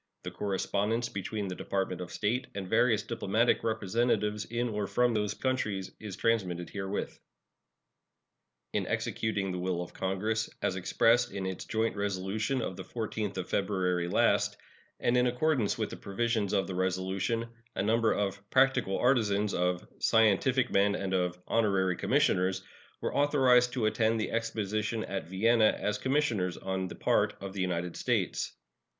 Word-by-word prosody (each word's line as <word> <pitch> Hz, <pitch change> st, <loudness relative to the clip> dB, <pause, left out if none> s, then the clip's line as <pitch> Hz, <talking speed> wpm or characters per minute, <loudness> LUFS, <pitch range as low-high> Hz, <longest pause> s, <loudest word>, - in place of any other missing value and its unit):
The -, -, -5 dB
correspondence 105 Hz, +4 st, -1 dB
between 100 Hz, +1 st, -4 dB
the 90 Hz, -, -3 dB
Department 95 Hz, -1 st, -2 dB
of 90 Hz, -, -6 dB
State 115 Hz, +4 st, -1 dB
and 95 Hz, -2 st, -4 dB
various 110 Hz, 0 st, +3 dB
diplomatic 115 Hz, 0 st, +1 dB
representatives 110 Hz, 0 st, 0 dB
in 120 Hz, +1 st, -1 dB
or 105 Hz, -2 st, -2 dB
from 125 Hz, -1 st, +2 dB
those 105 Hz, -2 st, 0 dB
countries 110 Hz, -8 st, -1 dB
is 105 Hz, -4 st, -6 dB
transmitted 95 Hz, -7 st, 0 dB
herewith. 95 Hz, 0 st, -4 dB, 1.5 s
In -, -, 0 dB
executing 100 Hz, -3 st, -1 dB
the 90 Hz, -, -3 dB
will 90 Hz, -1 st, -1 dB
of 90 Hz, -, -6 dB
Congress, 105 Hz, +4 st, -1 dB
as 95 Hz, -, +1 dB
expressed 115 Hz, +6 st, +3 dB
in 95 Hz, -1 st, -4 dB
its 95 Hz, -1 st, -4 dB
joint 110 Hz, 0 st, 0 dB
resolution 100 Hz, +5 st, -1 dB
of 95 Hz, -, -4 dB
the 95 Hz, -, -6 dB
14th 110 Hz, -3 st, -4 dB
of 90 Hz, -, -3 dB
February 90 Hz, -3 st, 0 dB
last, -, -, +2 dB, 0.4 s
and 120 Hz, -, +2 dB
in 125 Hz, 0 st, +4 dB
accordance 125 Hz, -3 st, +1 dB
with -, -, -2 dB
the -, -, -6 dB
provisions 110 Hz, 0 st, -1 dB
of 100 Hz, -2 st, +2 dB
the 95 Hz, -, -5 dB
resolution, 95 Hz, +5 st, -1 dB, 0.3 s
a -, -, 0 dB
number 115 Hz, +2 st, +3 dB
of 100 Hz, -1 st, -1 dB
"practical 130 Hz, -7 st, +3 dB
artisans," 105 Hz, -5 st, +2 dB
of 90 Hz, 0 st, 0 dB
"scientific 115 Hz, +4 st, +3 dB
men," 100 Hz, +1 st, +3 dB
and 95 Hz, -1 st, -3 dB
of 90 Hz, -1 st, 0 dB
"honorary 95 Hz, -5 st, +2 dB
commissioners" 95 Hz, +2 st, +1 dB, 0.4 s
were -, -, -2 dB
authorized 130 Hz, -4 st, +4 dB
to 120 Hz, -4 st, 0 dB
attend 110 Hz, +1 st, +2 dB
the 110 Hz, -, -2 dB
exposition 110 Hz, -1 st, -1 dB
at 95 Hz, -3 st, -4 dB
Vienna 110 Hz, +4 st, +3 dB
as 105 Hz, 0 st, -1 dB
commissioners 120 Hz, -, 0 dB
on 95 Hz, -1 st, -2 dB
the -, -, -8 dB
part -, -, +1 dB
of 95 Hz, 0 st, -7 dB
the 100 Hz, -, -3 dB
United 90 Hz, -1 st, -2 dB
States. -, -, -1 dB
105 Hz, 155 wpm, -30 LUFS, 95-115 Hz, 1.5 s, in